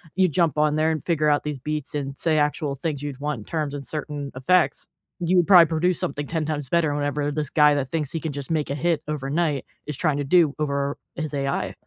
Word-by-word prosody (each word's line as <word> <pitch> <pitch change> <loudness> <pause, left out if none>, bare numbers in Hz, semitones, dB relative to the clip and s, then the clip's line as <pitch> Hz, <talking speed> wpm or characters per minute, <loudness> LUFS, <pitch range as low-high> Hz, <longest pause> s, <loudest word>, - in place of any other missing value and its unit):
you 190 0 +4
jump 165 -1 +1
on 150 0 +3
there 155 +1 +2
and 155 - -3
figure 155 -3 +1
out 145 0 +3
these 150 -2 -3
beats 150 +1 -4
and 140 -2 -3
say 160 -2 +2
actual 150 -1 0
things 145 0 -3
you'd 145 -2 -5
want 145 -4 -2
in 105 - -11
terms 150 -3 -2
and 145 -1 -5
certain 145 0 -5
effects, 175 +7 +2 0.3
you 175 +1 +2
would 175 - +3
probably 180 -4 +9
produce 170 +2 +1
something 145 +1 -3
10 160 -2 -2
times 150 -3 -3
better 165 -2 +2
whenever 145 0 -1
this 150 -1 -2
guy 150 -1 +5
that 135 -2 -2
thinks 150 -3 -2
he 165 - -2
can 155 -1 -4
just 140 +1 -6
make 155 -4 0
a 140 - -1
hit 165 +1 0
overnight 150 0 -1 0.2
is 150 -3 -4
trying 155 -3 +1
to 145 - -1
do 160 0 +4
over 140 -1 -1 0.2
his 155 -2 -4
AI. 140 -1 -1
150 Hz, 240 wpm, -24 LUFS, 140-160 Hz, 0.3 s, probably